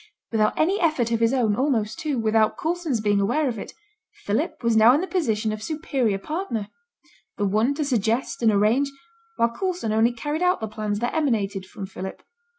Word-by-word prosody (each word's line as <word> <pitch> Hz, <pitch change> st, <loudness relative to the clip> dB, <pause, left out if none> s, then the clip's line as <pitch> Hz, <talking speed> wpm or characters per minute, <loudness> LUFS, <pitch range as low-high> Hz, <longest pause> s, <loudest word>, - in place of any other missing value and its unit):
Without 215 Hz, -2 st, +1 dB
any 370 Hz, +6 st, +2 dB
effort 305 Hz, -9 st, +1 dB
of 230 Hz, -, +1 dB
his 230 Hz, 0 st, +3 dB
own, 235 Hz, -6 st, +2 dB
almost, 230 Hz, -5 st, 0 dB
too, 300 Hz, -4 st, -2 dB
without 220 Hz, -1 st, +2 dB
Coulson's 325 Hz, -8 st, -1 dB
being 205 Hz, -1 st, +2 dB
aware 275 Hz, +9 st, +1 dB
of 230 Hz, -4 st, -3 dB
it, -, -, -7 dB, 0.5 s
Philip -, -, -2 dB
was 230 Hz, -1 st, +2 dB
now 225 Hz, +3 st, +7 dB
in 300 Hz, -, +1 dB
the -, -, -1 dB
position 225 Hz, -, 0 dB
of 215 Hz, -, -6 dB
superior 265 Hz, -6 st, -1 dB
partner; 235 Hz, -, -4 dB, 0.7 s
the 205 Hz, -, 0 dB
one 215 Hz, +8 st, +2 dB
to 300 Hz, 0 st, -1 dB
suggest 235 Hz, -1 st, 0 dB
and 225 Hz, -2 st, +4 dB
arrange, 220 Hz, +7 st, +2 dB, 0.5 s
while 235 Hz, -, +2 dB
Coulson 360 Hz, -, -2 dB
only 225 Hz, +2 st, +3 dB
carried 295 Hz, +7 st, -3 dB
out 360 Hz, 0 st, +2 dB
the 220 Hz, -, -3 dB
plans 210 Hz, -1 st, -3 dB
that 240 Hz, -, -1 dB
emanated 210 Hz, -, 0 dB
from 195 Hz, -, -7 dB
Philip. 190 Hz, 0 st, -8 dB
230 Hz, 190 wpm, -24 LUFS, 215-295 Hz, 0.7 s, now